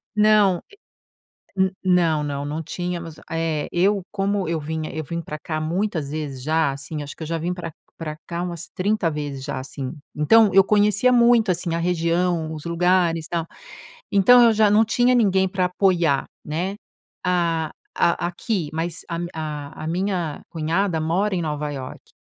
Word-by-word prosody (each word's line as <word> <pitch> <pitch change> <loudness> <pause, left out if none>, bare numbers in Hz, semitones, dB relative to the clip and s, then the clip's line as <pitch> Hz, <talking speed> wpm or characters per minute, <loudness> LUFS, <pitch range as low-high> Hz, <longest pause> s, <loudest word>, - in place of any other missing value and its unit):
Não, 210 -4 +4
e 410 - -17 0.9
n 190 0 +1
não, 170 -4 +3
não, 140 -1 -3
não 150 +3 -3
tínhamos. 175 0 -5 0.2
Eh, 165 -2 -1
eu, 195 +3 +2
como 195 -2 -1
eu 165 -1 0
vinha 155 +1 -4
eu 155 0 -3
vim 170 +3 -4
pra 155 -2 -7
cá 155 0 -4
muitas 165 -2 -2
vezes 145 -4 -5
já, 155 0 +1
assim, 140 +2 -6
acho 145 0 -7
que - - -9
eu - - -4
já 165 +1 -2
vim 170 +3 -2
pra 170 -3 -6 0.2
pra 155 -2 -5
cá 170 0 -3
umas 170 -2 -5
30 205 -1 +1
vezes 145 -3 -4
já, 140 - -3
assim. 130 0 -6 0.2
Então 210 +8 +5
eu 195 0 +7
conhecia 210 +4 +3
muito, 235 -3 +5
assim, 170 -1 -2
a - - -1
região, 170 -1 0
os 155 -2 -7
lugares 170 -1 +2
e - - -17
tal. 170 -1 -2 0.6
Então 215 +5 +7
eu 230 - +6
já 215 -1 +4
não 220 +2 +5
tinha 245 +2 +3
ninguém 195 -5 +3
pra 185 -1 0
apoiar, 175 -6 +2 0.2
né? 175 +6 -3 0.5
A 170 -3 +1 0.3
a 170 0 +2
aqui, 180 -1 -2
mas 165 +1 -3
a 170 - -3
mi 175 0 -3
a 150 -2 -4
a - - -4
a - - -4
minha 175 -2 -2
cunhada 165 +3 0
mora 185 +6 0
em 175 - -1
Nova 150 -1 -2
Iorque. 130 -2 -8
170 Hz, 185 wpm, -23 LUFS, 155-190 Hz, 0.9 s, eu